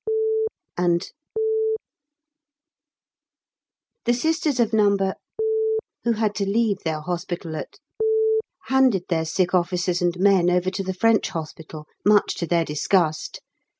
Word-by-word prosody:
and. 175 0 +1 2.9
The 240 - +3
Sisters 315 0 0
of 230 -2 +2
No. 205 -2 +4 1.1
who 235 - +3
had 215 -1 0
to 200 - 0
leave 210 -2 +1
their 160 -3 -3
hospital 170 -1 -4
at 400 - -7 0.9
handed 260 -8 +3
their 160 -2 +1
sick 175 +3 0
officers 180 0 +1
and 175 0 +1
men 190 -2 +4
over 180 +1 +1
to 195 - -3
the 190 -1 -3
French 225 +2 +3
hospital, 155 -1 -7 0.2
much 210 0 +4
to 170 - -2
their 170 -1 +2
disgust. 155 +1 0
185 Hz, 115 wpm, -23 LUFS, 170-215 Hz, 2.9 s, No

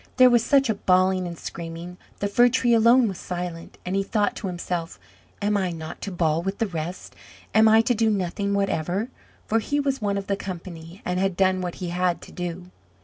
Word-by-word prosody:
There 255 -1 +7
was 240 -2 +4
such 275 +1 +4
a 220 - +2
bawling 185 -1 +2
and 170 -1 -7
screaming 170 +2 -7 0.2
the 200 - +1
Fir 240 +5 +5
tree 245 -1 +2
alone 235 +2 +5
was 190 -3 -5
silent, 175 -2 -6
and 180 +1 -2
he 195 - +2
thought 205 +1 0
to 200 - -4
himself, 175 -2 -4 0.4
"Am 205 +1 +2
I 190 -2 +1
not 160 -2 -7
to 200 - -4
bawl 165 -2 +1
with 195 +2 -3
the 225 - +1
rest? 175 -2 -6 0.4
am 220 0 +6
I 220 +1 +6
to 245 - +1
do 225 -1 +2
nothing 200 0 -1
whatever?" 195 +2 -1 0.4
for 225 - +2
he 285 +6 -1
was 275 -3 -1
one 200 -1 0
of 200 - -4
the 200 - 0
company, 175 -2 -8
and 180 0 -1
had 190 -2 0
done 185 -1 +2
what 175 -1 -4
he 180 -2 -5
had 180 0 0
to - - -12
do. 180 0 -6
190 Hz, 215 wpm, -24 LUFS, 175-215 Hz, 0.4 s, There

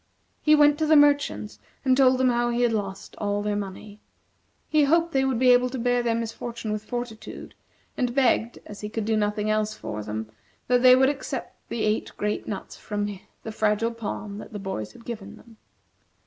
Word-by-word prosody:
He 305 0 +5
went 295 0 +5
to 310 - +1
the 310 - +6
merchants, 285 - +3 0.3
and 260 -1 +5
told 260 -1 +5
them 260 0 +3
how 240 0 +1
he 240 +1 +1
had 235 -1 +2
lost 195 -3 -4
all 205 0 -1
their 210 0 -1
money. 205 +1 -6 0.7
He 305 -2 +3
hoped 335 +3 +3
they 270 -3 +2
would 265 -3 0
be 250 +1 +5
able 250 0 +4
to 260 - -5
bear 245 0 +1
their 235 -1 0
misfortune 230 0 -4
with 210 0 -3
fortitude, 235 -3 -6 0.4
and 245 -1 -1
begged, 240 -3 +2
as 205 - -10
he 210 - -4
could 220 -1 -3
do 220 0 +1
nothing 210 0 0
else 215 0 0
for 110 -1 -5
them, 110 +1 -5 0.4
that 245 0 +3
they 255 0 +8
would 265 +1 +4
accept 285 -1 -5
the 230 - -2
eight 215 +1 0
great 210 0 -2
nuts 200 -3 -6
from 205 -1 -3 0.4
the 220 - -5
Fragile 215 +2 +1
Palm 210 -2 -5
that - - -10
the - - -4
boys 190 - -5
had 230 - -16
given 220 -5 -7
him. 230 -2 -18
230 Hz, 205 wpm, -25 LUFS, 210-255 Hz, 0.7 s, they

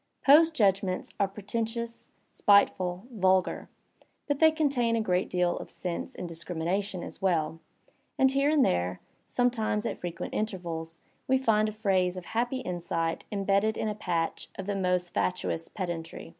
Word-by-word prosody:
Poe's 310 +4 +8
judgments 195 - +1
are 200 - +3
pretentious, 225 +4 -4 0.2
spiteful, 185 -2 +3
vulgar; 190 -4 +1 0.6
but 285 -2 -1
they 320 - +7
contain 280 -7 +1
a - - +1
great 185 -4 0
deal 180 -1 +1
of - - -7
sense 175 -2 -5
and 180 - -5
discrimination 175 +3 -3
as - - -9
well, 165 -4 +1 0.6
and 265 0 +4
here 275 +2 +2
and 300 -3 +4
there, 90 +1 0 0.3
some 245 0 +2
tknes 220 -1 -1
at - - -4
frequent 175 0 -5
intervals, 170 -6 -3 0.3
we 265 - +4
find 215 -4 +2
a - - -5
phrase 190 -4 +1
of 180 - -7
happy 245 +3 -1
insight 170 -4 -2
imbeSded 200 +1 +2
ii^ 215 - -1
a - - -2
patch 170 -5 -2
of 190 - -6
the 200 0 -2
most 180 -2 0
fatuous 180 -2 -1
pedantry." 170 -5 -5
195 Hz, 155 wpm, -28 LUFS, 175-230 Hz, 0.6 s, Poe's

